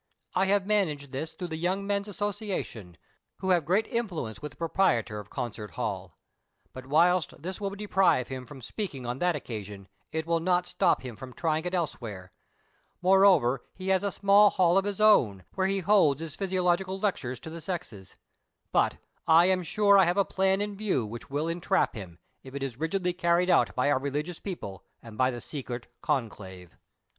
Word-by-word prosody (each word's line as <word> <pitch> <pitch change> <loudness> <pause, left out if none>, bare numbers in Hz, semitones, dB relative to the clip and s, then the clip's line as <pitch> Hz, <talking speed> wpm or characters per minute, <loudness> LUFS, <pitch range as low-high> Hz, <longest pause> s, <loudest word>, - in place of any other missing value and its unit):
I 190 - +2
have 200 0 +2
managed 160 -10 0
this 155 +4 -4
through 180 -2 -6
the 160 - -4
Young 185 +4 -1
Men's 200 0 -1
Association, 200 - -4 0.4
wlio 190 -1 +2
have 170 -4 +1
great 190 +7 +2
intiuence 175 - -3
with 150 -1 -6
the - - -24
proprietor 165 - +1
of 105 -1 -10
Concert 110 -5 -5
Hall. - - -4 0.6
But, 130 0 -9
whilst 170 +3 +2
this 185 +6 -6
will 200 - -1
de 205 +1 -7
prive 190 -11 +3
him 130 -2 -7
from 135 -4 -11
speaking 140 - -5
on 120 +2 -3
that 175 -1 +2
occasion, 105 -7 -7 0.2
it 160 0 -2
will 165 0 +1
not 180 +1 +1
stop - - +1
him 125 -3 -7
from 125 +4 -10
trying 160 +3 -1
it 180 +1 -1
elsewhere; 110 - -4 0.7
moreover, 185 -10 +5
he 190 0 -5
has 190 0 +3
a 200 - +1
small 200 +2 +5
hall 175 -2 +3
of 195 0 +3
his 205 -1 -3
own, 120 - +4
where 190 0 +1
he 195 0 0
holds 180 -7 +4
his 160 -2 -6
physiological 185 0 0
lectures 130 - -2
to 160 - -8
the 165 0 -7
sexes; 110 - -6 0.6
but, - - +2 0.3
I 165 +2 +7
am 185 0 +2
sure 200 +3 +4
I 190 - +6
have 175 +3 0
a 200 - +4
plan 190 +1 +1
in 205 0 -2
view 195 - 0
which 120 +6 -8
will 145 +3 -1
entrap 175 +3 +1
him, 90 -6 -9 0.2
if 135 0 -12
it 140 - -3
is 130 -3 -5
rigidly 180 +3 -1
carried 175 +1 +2
out - - +3
by 130 +3 +2
our 130 - +2
religious 145 +5 -3
people, 100 - -7 0.2
and 115 -2 -11
by 130 +3 +3
the 120 -2 -5
secret 125 -5 -6 0.2
conclave. 95 - -4
165 Hz, 190 wpm, -28 LUFS, 130-190 Hz, 0.7 s, I